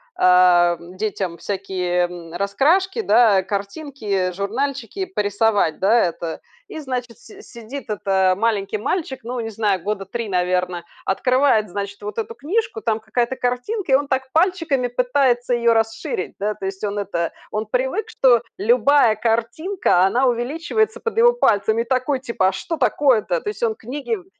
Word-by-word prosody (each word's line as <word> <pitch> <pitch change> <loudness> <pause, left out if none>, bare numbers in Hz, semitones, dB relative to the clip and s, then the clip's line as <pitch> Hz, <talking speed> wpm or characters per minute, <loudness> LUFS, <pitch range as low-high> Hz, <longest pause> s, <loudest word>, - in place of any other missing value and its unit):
ам, 180 -1 +4
детям 190 -4 -3
всякие, 185 -3 -2
м, 170 -2 -10
раскрашки, 300 - +1
да, 225 - +4
картинки, 200 -1 -3
журнальчики 255 - -3
порисовать, 205 - 0
да, 215 +5 +4
это. 170 -1 -4 0.3
И, - - -7
значит, 250 -5 -5
си 415 -1 -15
сидит 235 - -9
это 190 -2 +1
маленький 215 -2 0
мальчик, 265 - -2
ну, 245 +2 -4
не 225 -1 -3
знаю, 205 -4 0
года 200 +1 -3
3, 230 +2 -5
наверно, 180 -1 0 0.2
открывает, 255 +1 +2
значит, 200 +2 -5
вот 210 +1 -5
эту 225 +1 -5
книжку, 310 - -2
там 220 0 0
какая-то 235 +3 -1
картинка, 260 - -2
и - - +9
он 285 +1 +1
так 265 -1 -2
пальчиками 325 -7 +1
пытается 245 0 +1
ее 235 -1 +3
расширить, 225 -4 -2
да. 210 +2 -1
То 195 - -6
есть 195 +1 -7
он 205 0 -2
это 175 -4 -2 0.2
он 215 +1 -2
привык, 265 - -1
что 250 - +3 0.2
любая 240 +2 +4
картинка, 230 - +1
она 245 +7 +2
увеличивается 330 - -1
под 455 -1 -4
его 480 +1 +6
пальцами. 220 - +2
И - - -4
такой 255 +2 0
типа: 235 -8 0
"А - - -2
что 325 - -4
такое-то?" 220 - +2
То - - -3
есть 210 +2 -6
он 225 -1 +2
книги 280 - -4
в 370 -4 -11
225 Hz, 160 wpm, -21 LUFS, 195-270 Hz, 0.3 s, и